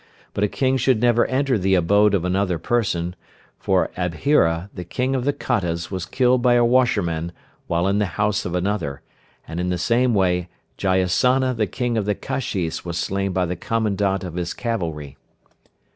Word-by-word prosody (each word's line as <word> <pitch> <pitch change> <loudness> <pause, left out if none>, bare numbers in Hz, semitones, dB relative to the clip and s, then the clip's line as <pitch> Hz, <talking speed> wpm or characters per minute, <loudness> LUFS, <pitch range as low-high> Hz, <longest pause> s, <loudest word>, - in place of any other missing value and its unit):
But 100 - -1
a - - +4
King 130 +5 0
should 130 -2 +2
never 120 0 +3
enter 130 -3 +1
the 95 +1 +2
abode 100 +4 +4
of 90 -3 -1
another 90 -1 0
person, 90 -4 -1 0.4
for - - +1
Abhira, 90 - +1
the 90 - -6
King 125 +9 -2
of 130 -2 -1
the 145 - +3 0.2
Kottas 85 -8 -1
was 90 -3 -4
killed 125 +3 +2
by 120 -1 +4
a 120 0 +4
washerman 100 -10 +1 0.4
while 85 +2 +1
in 100 +1 +1
the 105 - +1
house 105 0 +1
of 90 - -3
another, 90 -7 -2 0.4
and 85 +1 -5
in 90 0 -1
the 90 - 0
same 120 +6 +2
way 90 -2 +1 0.3
Jayasana 100 +8 +2
the 110 -2 0
King 120 +3 -1
of 105 - -2
the 105 0 0
Kashis 95 -11 -3
was 85 -1 -4
slain 95 +2 -1
by 90 0 0
the 90 +1 -3
commandment 100 -2 -1
of 90 -3 -6
his 90 0 -3
cavalry. 80 - -4
100 Hz, 180 wpm, -22 LUFS, 90-120 Hz, 0.4 s, a